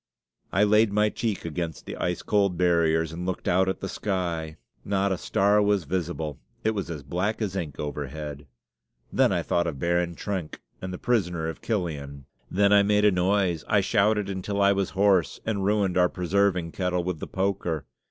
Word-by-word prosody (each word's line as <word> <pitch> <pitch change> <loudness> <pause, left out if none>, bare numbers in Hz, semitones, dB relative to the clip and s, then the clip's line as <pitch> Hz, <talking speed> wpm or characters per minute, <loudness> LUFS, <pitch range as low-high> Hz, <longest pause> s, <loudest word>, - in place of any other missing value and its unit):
I 100 - +3
laid 105 0 +4
my 105 +1 +3
cheek 105 -4 -3
against 85 -1 -4
the - - -6
ice 90 0 -2
cold 100 -4 +2
barriers 80 -2 +2
and 85 +2 -6
looked 95 0 -3
out 95 +1 +3
at 95 - -3
the 95 - -3
sky; 85 -6 -3 0.3
not 100 0 0
a 95 - 0
star 100 +2 +3
was 100 -2 +2
visible; 80 -3 -3 0.2
it 110 - +2
was 100 -5 -3
as 75 -4 -5
black 90 +10 -1
as 100 -4 -2
ink 80 -7 -4
overhead. 75 0 -5 0.7
Then - - +4
I - - 0
thought 85 0 +1
of 75 -5 -3
Baron 85 +2 0
Trenck 95 -6 -4 0.2
and 95 - -4
the 90 - -5
prisoner 90 -10 0
of 80 - -8
Chillon. 75 - -3 0.2
Then 100 +1 +3
I 100 - +7
made 105 +1 +3
a 105 - +6
noise. 90 -2 +1
I 100 -2 +3
shouted 105 0 +2
until 100 +1 -3
I 100 0 +5
was 100 -1 0
hoarse, 95 -8 +3
and 105 -3 -1
ruined 100 -3 +2
our 90 0 +4
preserving 90 -1 +1
kettle 90 -1 -1
with 90 -2 -3
the - - -5
poker. 95 -6 -1
90 Hz, 190 wpm, -26 LUFS, 85-100 Hz, 0.7 s, I